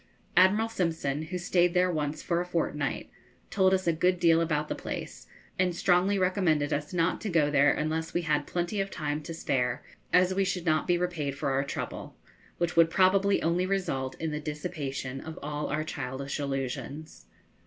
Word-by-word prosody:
Admiral 195 +5 +5
Simpson, 165 -9 -1
who 180 +3 -4
stayed 175 0 +2
there 180 0 +3
once 150 -2 -2
for 170 0 0
a - - -3
fortnight, 150 -5 -2 0.4
told 190 -2 +3
us 190 0 +1
a 170 - +3
good 180 +2 +1
deal 165 -1 +5
about 150 -2 0
the - - -2
place, - - -6 0.3
and 180 -2 +2
strongly 180 +3 +3
recommended 180 -6 +1
us 150 +1 -3
not 175 -1 0
to 215 - -3
go 155 -5 +2
there 145 0 +5
unless 160 +1 -2
we 175 - -1
had 150 -2 0
plenty 175 +3 -1
of 195 - -3
time 150 -3 -3
to 155 - -8
spare, 125 -6 -1 0.3
as 180 +1 +4
we 195 +1 +2
should 185 -2 -2
not 155 -2 +2
be 175 - +3
repaid 160 -6 -2
for 140 - -1
our 135 +1 +1
trouble, 140 - -6 0.4
which 175 0 -1
would 165 -1 +6
probably 195 +3 +3
only 175 +3 +1
result 160 -10 -1
in 160 -1 -2
the 150 - -3
dissipation 145 -4 -4
of 160 0 -8
all 150 0 -3
our 155 +1 -1
childish 140 -1 -4
illusions. 140 +2 -5
165 Hz, 185 wpm, -28 LUFS, 145-180 Hz, 0.4 s, would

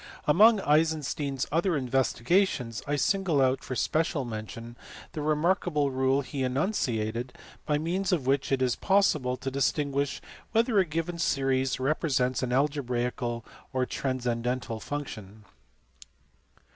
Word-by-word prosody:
Among 210 +8 +6
Eisenstein 150 -3 +1
s 135 - -1
other 170 +1 +1
investigations 130 - +1
I 145 - +1
single 180 0 +1
out 130 0 +2
for 130 - -5
special 155 0 0
mention 115 +1 -7 0.4
the 155 - -5
remarkable 150 -1 +1
rule 130 +1 +2
he 140 0 -5
enunciated 125 - -1 0.3
by 150 - +2
means 180 +6 -1
of 160 -8 0
which 135 +1 +1
it 130 -1 +2
is 125 -2 +1
possible 155 -10 +2
to 135 +1 -4
distinguish 140 0 0 0.3
whether 225 -2 +3
a 190 - +4
given 165 +2 -3
series 135 -3 +1
represents 130 -2 0
an 125 -2 -2
algebraical 125 -4 -1 0.3
or 130 -1 +1
a - - +1
transcendental 125 -3 -2
function. 110 -7 -7
135 Hz, 130 wpm, -28 LUFS, 125-155 Hz, 0.4 s, Among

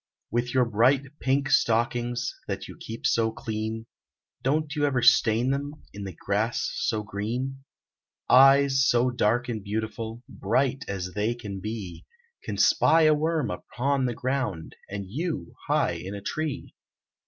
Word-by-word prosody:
With 120 +2 -1
your 130 -1 +4
bright 130 +6 +2
pink 140 +2 +1
stockings, 120 +2 +1
That - - -4
you - - -10
keep 115 +1 -8
so 115 -1 +2
clean; 110 -2 -4 0.6
Don't 150 +2 0
you 150 - 0
ever 130 -4 0
stain 120 0 +4
them 140 +1 -2 0.2
In 100 0 -6
the 95 -4 -7
grass 105 +4 0
so 110 -5 -1
green? 120 +7 -4 0.6
Eyes 135 +1 +6
so 120 +1 +3
dark 120 +1 +1
and 110 -4 -4
beautiful, 110 +2 -4
Bright 130 +6 0
as 90 -2 -4
they 105 +3 0
can 100 -5 -7
be, 105 -4 -6 0.4
Can - - -4
spy 165 0 +5
a 155 0 +6
worm 155 -5 0
upon 130 +7 -1
the 120 - -3
ground, 130 -11 -3
And 100 0 -5
you 145 - -4
high - - +2
in 95 +2 -6
a 100 - -7
tree. 155 +4 -4
120 Hz, 150 wpm, -26 LUFS, 110-135 Hz, 0.6 s, Eyes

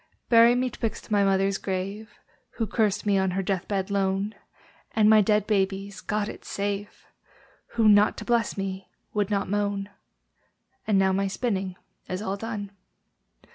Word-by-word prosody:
Bury 235 +1 +7
me 250 0 0
'twixt 225 -1 -5
my 205 -1 +4
mother's 195 0 +2
grave, 195 +3 -4 0.4
(Who 225 - -1
cursed 210 -1 0
me 200 -2 +3
on 190 0 +1
her 195 - 0
death 190 -2 -2
bed 195 -1 -2
lone) 195 +1 0 0.6
And 215 -1 +5
my 215 0 +7
dead 210 0 +2
baby's 195 -1 -1
(God 210 -1 -1
it - - -8
save!) 200 0 -4 0.7
Who, 225 -2 +4
not 210 0 +5
to - - -7
bless 235 -4 +1
me, 195 -1 -4 0.2
would 205 -1 0
not 200 -1 0
moan. 205 0 -1 1.0
And 210 -3 +3
now 190 0 +4
my 195 +1 +1
spinning 195 -3 -2 0.3
is 185 - -2
all 195 -2 -2
done. 205 -1 -5
200 Hz, 160 wpm, -26 LUFS, 195-215 Hz, 1.0 s, Bury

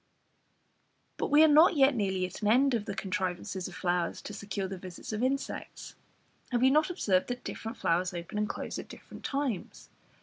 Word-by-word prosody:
But - - -2
we 295 +2 +7
are - - +8
not 310 +4 +6
yet 275 -1 +5
nearly 190 -5 0
at 180 - -8
an 210 - 0
end 260 +5 +4
of 225 -3 0
the 200 - -4
contrivances 190 -1 -3
of - - -10
flowers 175 -2 -1
to 210 - -7
secure 200 -1 -4
the 190 -1 -6
visits 185 +3 -8
of 215 - -2
insects. 270 +2 -3 0.6
Have 245 0 +1
you 260 - +6
not 305 +3 +3
observed 195 - +1
that 245 0 -4
different 225 +1 -6
flowers 180 -2 +1
open 175 +3 -5
and 210 - 0
close - - -4
at - - -8
different - - -12
times? 275 -8 -3
210 Hz, 195 wpm, -30 LUFS, 185-270 Hz, 0.6 s, are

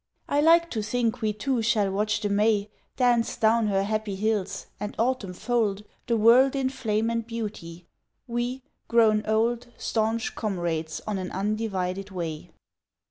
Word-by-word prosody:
I 290 - +2
like 335 +2 +5
to 220 - -1
think 235 +2 -1
we 215 -1 +1
two 240 +4 -1
shall 215 -3 +2
watch 210 +1 0
the 205 - -1
May 210 0 +2 0.3
Dance 245 -2 +2
down 225 0 +3
her 195 -1 +1
happy 215 -1 -2
hills 200 -1 -1
and 205 +1 -5
Autumn 225 -6 -1
fold 215 -3 0 0.2
The 235 -2 +2
world 245 +5 +6
in 265 -1 +1
flame 225 -3 -1
and 230 0 -1
beauty, 205 -7 -6 0.4
we 245 +1 -3 0.2
grown 220 -2 +4
old 230 +3 +1
Staunch 225 0 -1
comrades 170 -6 -3
on 210 -2 -2
an 185 -1 -4
undivided 195 -2 -2
way. 165 -5 -5
215 Hz, 150 wpm, -26 LUFS, 200-235 Hz, 0.4 s, world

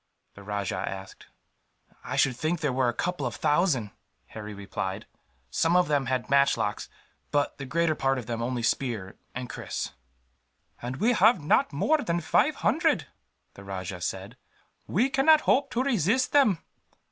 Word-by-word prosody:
the 100 - -13
rajah 100 -2 -3
asked. 95 0 -9 0.8
"I - - -4
should 130 -2 +3
think 155 +6 -1
there 150 -5 0
were 130 -1 +2
a - - +1
couple 170 +1 -2
of 115 - -5
thousand," 145 - +1 0.4
Harry 105 -1 -7
replied. 100 0 -4 0.5
"Some 165 +2 +2
of 180 0 +4
them 140 -3 +1
had 130 -1 -1
matchlocks, 140 -7 +2 0.4
but 145 0 0
the 135 - -6
greater 165 +3 +1
part 135 -2 0
of 125 - -5
them 115 0 -3
only 120 0 -2
spear 115 -7 -2 0.2
and 125 0 -4
kris." - - -5 0.9
"And 125 +2 -4
we 230 +5 +3
have 215 0 +5
not 150 - +3
more 305 - +2
than 175 -10 -1
five 160 - +2
hundred," - - +2 0.4
the 100 - -12
rajah 95 -2 -6
said. 95 +7 -4 0.5
"We 230 +9 +2
cannot 295 +3 +5
hope 280 +1 +2
to 255 0 0
resist 245 - +1
them. 270 - +4
135 Hz, 160 wpm, -27 LUFS, 110-180 Hz, 0.9 s, have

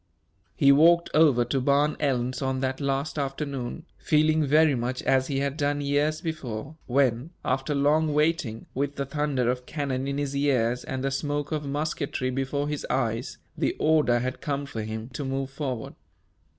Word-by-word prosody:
He 140 -1 +5
walked 170 +4 +5
over 145 -6 +5
to 130 +2 -1
Barn 145 +3 +2
Elms 130 -3 0
on 130 -1 -1
that 130 +1 -2
last 140 +2 -1
afternoon, 140 +1 -4
feeling 155 0 +3
very 150 +1 +4
much 125 +1 -2
as 130 0 +2
he 135 -2 -1
had 140 +1 -2
done 145 -1 0
years 145 +2 0
before, 150 - -5
when, 125 +1 +1 0.2
after 135 +3 0
long 150 +2 +3
waiting, 150 -7 0
with 140 +2 -2
the 140 - -2
thunder 140 -3 -1
of 125 0 -6
cannon 135 -3 -2
in 140 0 -2
his 140 -1 -2
ears 125 -4 +1
and 130 0 -4
the 135 - 0
smoke 145 +1 -2
of 150 -2 -2
musketry 145 -2 -2
before 135 +2 -1
his 150 -1 -3
eyes, 115 -3 -1 0.2
the - - 0
order 155 -6 +3
had 130 +1 -3
come 140 -2 -2
for 115 -5 -5
him 110 +1 -5
to 145 +3 -5
move 135 0 -3
forward. 135 -5 -4
140 Hz, 175 wpm, -26 LUFS, 130-150 Hz, 0.2 s, He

